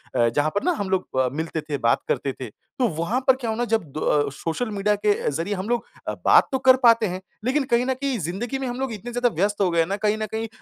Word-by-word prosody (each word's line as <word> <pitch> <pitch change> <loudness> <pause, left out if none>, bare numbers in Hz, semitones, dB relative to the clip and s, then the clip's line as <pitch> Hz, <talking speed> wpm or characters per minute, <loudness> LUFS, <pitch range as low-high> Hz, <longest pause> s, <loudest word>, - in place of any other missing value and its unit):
अ, 120 -2 +4
जहाँ 145 +6 +1
पर 205 - 0
ना 360 - +2
हम 200 - -2
लोग 185 -8 -1
अ, 130 - +2
मिलते 160 0 -3
थे, 150 -1 -4
बात 115 -3 +2
करते 135 -2 -1
थे, 125 - -5 0.3
तो 250 - +3
वहाँ 205 +10 0
पर 265 - +6
क्या 240 -4 -4
हुआ 220 - -3
ना 240 - 0
जब 225 -4 +1
द 145 -2 +1
सोशल 170 +11 -3
मीडिया 205 +1 +1
के 205 0 +2 0.2
ज़रिए 165 +8 -2
हम 190 +5 -5
लोग 240 -1 0 0.2
अ, - - -1
बात - - +6
तो 265 - +1
कर 260 - +9
पाते 230 -2 +6
हैं, 185 +1 -5 0.2
लेक़िन 275 +3 +2
कहीं 240 +1 +3
न 260 - +1
कहीं 275 -3 0
ज़िंदगी 195 - -3
में 265 - -3
हम 245 +1 -4
लोग 265 -4 -2
इतने 230 +4 -7
ज़्यादा 245 0 +2
व्यस्त 205 +4 0
हो 185 - +3
गए 170 - +1
हैं 165 - +3
ना 200 +1 -2
कहीं 210 0 +1
न 215 - -2
कहीं 225 +1 -3
210 Hz, 285 wpm, -23 LUFS, 165-240 Hz, 0.3 s, कर